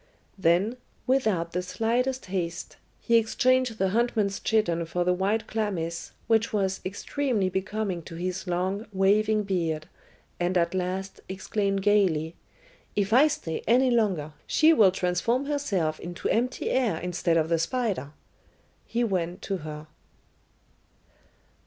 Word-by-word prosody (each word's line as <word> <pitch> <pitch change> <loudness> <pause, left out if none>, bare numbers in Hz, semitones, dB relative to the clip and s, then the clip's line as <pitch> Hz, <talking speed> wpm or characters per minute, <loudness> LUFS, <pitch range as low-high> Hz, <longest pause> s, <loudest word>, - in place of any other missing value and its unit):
Then, 190 +6 +2 0.3
without 215 -11 +1
the 180 - -1
slightest 245 +7 -1
haste, 180 -2 -4 0.2
he 235 - +3
exchanged 255 +1 +2
the 190 -2 +1
huntsman's 215 -2 +1
chiton 175 -7 +1
for 175 +2 -1
the 180 +1 +2
white 200 +5 0
chlamys, 185 -7 -3 0.2
which 225 0 +2
was 195 -2 0
extremely 205 +1 -1
becoming 190 -1 -2
to 165 - -8
his 185 +2 -4
long, 185 +4 -1
waving 210 +2 +3
beard, 165 -5 -1 0.5
and 180 +1 +1
at 170 0 +1
last, 185 +1 -3
exclaiming 195 +1 -1
gaily, 180 -6 +2 0.6
"If 205 +1 0
I 270 +5 +7
stay 290 - -3
any 250 +2 +4
longer, 190 -10 +1
she 320 +1 +5
will 215 -10 +6
transform 190 +9 0
herself 200 - -1
into 175 +1 -5
empty 250 +3 0
air 240 -10 +1
instead 175 -1 0
of 160 0 +1
the 165 -1 +2
spider," 195 - -1 0.8
he 240 +1 0
went 180 -5 -2
to 195 - -2
her. 150 -2 -7
195 Hz, 135 wpm, -27 LUFS, 175-225 Hz, 0.8 s, I